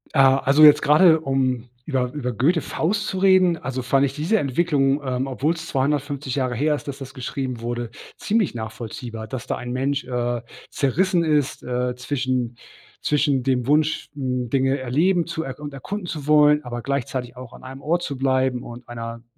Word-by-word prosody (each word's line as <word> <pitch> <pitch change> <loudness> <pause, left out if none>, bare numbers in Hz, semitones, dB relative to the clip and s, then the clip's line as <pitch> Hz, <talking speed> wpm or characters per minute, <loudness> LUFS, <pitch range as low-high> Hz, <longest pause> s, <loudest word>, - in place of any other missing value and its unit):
Ah, 135 -1 +6
also 140 +3 +4
jetzt 150 -1 +8
gerade 160 +2 +6
um 130 -4 -1 0.2
über 130 -4 -1
über 130 -4 -3
Goethe 155 - +2
Faust 200 +5 -1
zu 190 - -3
reden, 185 -2 +4
also 130 -3 -4
fand 135 +2 +2
ich 135 - -3
diese 155 +9 +1
Entwicklung, 140 - +1
ähm, 130 -1 -1
obwohl 135 +4 0
es 165 0 -7
250 140 -1 -1
Jahre 130 -3 0
her 150 +5 +1
ist, 145 - -9
dass 140 0 -5
das 135 0 -9
geschrieben 130 -1 -4
wurde, 120 0 -3 0.3
ziemlich 215 -2 0
nachvollziehbar. 115 0 -6
Dass 120 +1 -6
da - - -1
ein 120 - -6
Mensch, 135 +3 -1
äh, 120 -1 -2 0.3
zerrissen 170 +6 +1
ist, 150 -4 0
äh, 125 0 -2
zwischen 125 -2 -2 0.4
zwischen 145 -2 +1
dem 125 -1 0
Wunsch, 150 +3 +1
hm, 125 -4 -2
Dinge 135 0 +2
erleben 160 +8 +1
zu 170 -1 -4
er 135 +2 -7
und 145 -1 -7
erkunden 190 +8 -5
zu 150 -4 -6
wollen, 150 0 +5
aber 120 -1 -6
gleichzeitig 130 -2 -3
auch 125 -1 -10
an - - -14
einem 135 +1 -9
Ort 170 +3 0
zu 140 - -3
bleiben 130 -1 +1
und 120 +1 -10
einer 115 0 -7
135 Hz, 185 wpm, -23 LUFS, 125-150 Hz, 0.4 s, jetzt